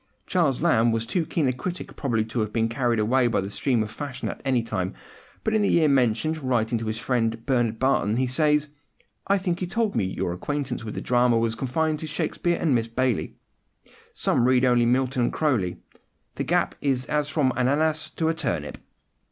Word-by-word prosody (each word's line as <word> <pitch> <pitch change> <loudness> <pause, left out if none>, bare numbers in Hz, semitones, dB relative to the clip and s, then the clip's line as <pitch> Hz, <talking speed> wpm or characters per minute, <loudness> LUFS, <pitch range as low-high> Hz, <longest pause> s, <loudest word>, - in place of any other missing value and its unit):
Charles 160 -6 +1
Lamb 120 -9 +4
was 115 0 -1
too 160 +7 -1
keen 155 -5 0
a 130 - +1
critic 180 +8 -6
probably 115 -6 0
to 115 +2 -4
have 110 -1 -1
been 115 0 +1
carried 120 -1 0
away 120 +4 +3
by 115 - +1
the 100 +1 -4
stream 120 -1 +1
of 105 - -7
fashion 135 -1 -5
at - - -7
any 130 -4 +1
time; 95 - -3 0.5
but 220 - 0
in 215 - +3
the 200 - +2
year 165 -2 +4
mentioned, 135 +3 +1
writing 120 -3 0
to 115 - -5
his 110 0 -2
friend 115 -1 -1
Bernard 120 -4 +1
Barton, 120 -4 +1
he 130 - +2
says: 150 +3 +2 0.6
"I 200 - +3
think 180 -2 -2
you 180 - -1
told 220 +2 -1
me 95 - +1
your 90 -1 -2
acquaintance 135 +5 -3
with 110 - -6
the - - -4
drama 120 -1 +3
was 115 0 +1
confined 150 +6 -1
to 160 - -5
Shakespeare 170 +3 -1
and 155 -5 +2
Miss 115 -2 +1
Baillie: 125 0 -1 0.8
some 120 - +1
read 130 0 +4
only 120 -1 +3
Milton 130 +1 +1
and - - -1
Croly. 120 - 0 0.6
The - - -3
gap - - +1
is 130 -3 0
as 150 -1 0
from 140 -5 +1
an 125 0 0
ananas 155 +2 +1
to 160 - 0
a 165 - +2
turnip." 75 - -3
130 Hz, 210 wpm, -25 LUFS, 115-150 Hz, 0.8 s, Lamb